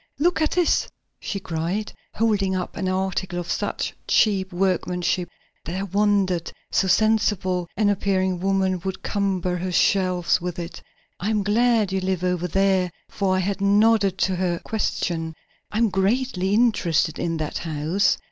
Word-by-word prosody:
"Look 335 Hz, +3 st, +2 dB
at 310 Hz, -, +3 dB
this," 355 Hz, -2 st, +2 dB, 0.3 s
she 200 Hz, -, -4 dB
cried, 180 Hz, +4 st, -3 dB, 0.2 s
holding 205 Hz, -4 st, +1 dB
up 180 Hz, -1 st, -4 dB
an 185 Hz, -, -2 dB
article 190 Hz, -1 st, -2 dB
of 175 Hz, -1 st, -3 dB
such -, -, -2 dB
cheap 195 Hz, -3 st, +2 dB
workmanship 180 Hz, -1 st, 0 dB, 0.4 s
that 170 Hz, -, -4 dB
I 190 Hz, -, -2 dB
wondered 200 Hz, -3 st, +1 dB, 0.2 s
so 190 Hz, -, +2 dB
sensible 190 Hz, -3 st, +2 dB
an 210 Hz, -1 st, +3 dB
appearing 190 Hz, -2 st, +1 dB
woman 190 Hz, -1 st, +1 dB
would 190 Hz, -1 st, -4 dB
cumber 190 Hz, -3 st, -1 dB
her 180 Hz, +1 st, -3 dB
shelves 180 Hz, -1 st, +2 dB
with 175 Hz, -1 st, -4 dB
it. 170 Hz, 0 st, -6 dB, 0.4 s
"I 200 Hz, -, -2 dB
am 210 Hz, -2 st, +1 dB
glad 220 Hz, 0 st, +2 dB
you 190 Hz, 0 st, 0 dB
live 185 Hz, -1 st, -1 dB
over 180 Hz, -1 st, 0 dB
there," 190 Hz, 0 st, +2 dB, 0.2 s
for 195 Hz, -2 st, 0 dB
I -, -, +1 dB
had 195 Hz, +1 st, -2 dB
nodded 200 Hz, -1 st, +3 dB
to 190 Hz, -1 st, +1 dB
her 175 Hz, -1 st, 0 dB
question. 165 Hz, -6 st, -2 dB, 0.4 s
"I'm 225 Hz, +1 st, +2 dB
greatly 195 Hz, 0 st, +1 dB
interested 180 Hz, -9 st, +2 dB
in 165 Hz, -1 st, -1 dB
that 155 Hz, -1 st, -3 dB
house. 165 Hz, +5 st, +1 dB
190 Hz, 155 wpm, -23 LUFS, 180-205 Hz, 0.4 s, at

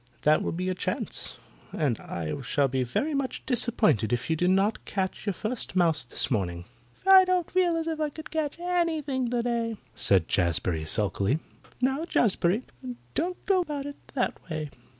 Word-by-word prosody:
That 155 Hz, +1 st, +4 dB
will -, -, -1 dB
be 175 Hz, +2 st, -3 dB
your 185 Hz, 0 st, 0 dB
chance, 180 Hz, -, -1 dB, 0.3 s
and 135 Hz, -7 st, 0 dB
I 80 Hz, -2 st, -4 dB
shall 140 Hz, +2 st, +1 dB
be 130 Hz, 0 st, -1 dB
very 275 Hz, -, -1 dB
much 275 Hz, -2 st, -2 dB
disappointed 215 Hz, -, +2 dB
if 120 Hz, +6 st, -1 dB
you -, -, +3 dB
do 180 Hz, +3 st, +1 dB
not 195 Hz, +4 st, +2 dB
catch 190 Hz, +2 st, -3 dB
your 200 Hz, -, +1 dB
first 220 Hz, -1 st, -4 dB
mouse 165 Hz, -4 st, +3 dB
this 120 Hz, -, -2 dB
morning." 85 Hz, -6 st, -1 dB, 0.4 s
"I 385 Hz, -1 st, +9 dB
don't 365 Hz, -2 st, 0 dB
feel 350 Hz, -2 st, +2 dB
as 325 Hz, -, -2 dB
if 320 Hz, -1 st, -2 dB
I 305 Hz, -1 st, 0 dB
could 315 Hz, +2 st, -10 dB
catch 310 Hz, -2 st, -2 dB
anything 320 Hz, -8 st, 0 dB
today," 235 Hz, -2 st, -1 dB, 0.2 s
said 95 Hz, -4 st, +2 dB
Jazbury 85 Hz, -2 st, +1 dB
sulkily. 105 Hz, -, +1 dB, 0.4 s
"Now, 265 Hz, +5 st, +1 dB
Jazbury, 210 Hz, -, +2 dB, 0.5 s
don't 360 Hz, +3 st, -2 dB
go 385 Hz, -2 st, +3 dB
about 295 Hz, -5 st, -4 dB
it 285 Hz, 0 st, -7 dB, 0.2 s
that 250 Hz, -, +1 dB
way. 155 Hz, -2 st, -4 dB
220 Hz, 170 wpm, -27 LUFS, -, 0.5 s, I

